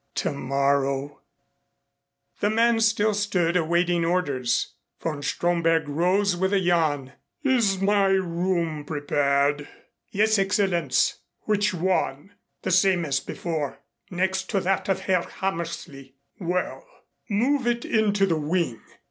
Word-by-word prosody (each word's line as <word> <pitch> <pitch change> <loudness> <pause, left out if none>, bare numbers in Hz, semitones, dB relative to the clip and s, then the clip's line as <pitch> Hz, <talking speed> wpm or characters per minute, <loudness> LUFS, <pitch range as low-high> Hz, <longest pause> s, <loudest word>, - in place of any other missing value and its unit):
Tomorrow 140 0 -1 1.2
The 205 - +1
man 230 +1 +3
still 215 -1 +2
stood 195 -5 0
awaiting 170 0 +2
orders. 145 -8 0 0.3
Von 155 -3 -3
Stromberg 165 0 +1
rose 180 +6 +1
with 190 +3 0
a 200 - +4
yawn. 155 -7 +1 0.3
"Is 235 -9 +2
my 200 0 +3
room 175 -4 0
prepared?" 145 -1 0 0.4
"Yes, 215 +1 +2
Excellenz." 190 -7 +1 0.2
"Which 210 -2 0
one?" 180 -2 -1 0.3
"The - - -1
same 185 -1 +3
as 140 -2 0
before 155 -4 -4 0.3
next 190 +1 -1
to 195 - +1
that 190 +1 -1
of 190 0 +1
Herr 185 -2 +1
Hammersley." 165 -8 -5 0.2
"Well, 180 0 -2 0.5
move 250 +5 +1
it 240 0 0
into 205 -3 +2
the 165 -4 0
wing. 155 -6 -1
175 Hz, 115 wpm, -25 LUFS, 150-195 Hz, 1.2 s, a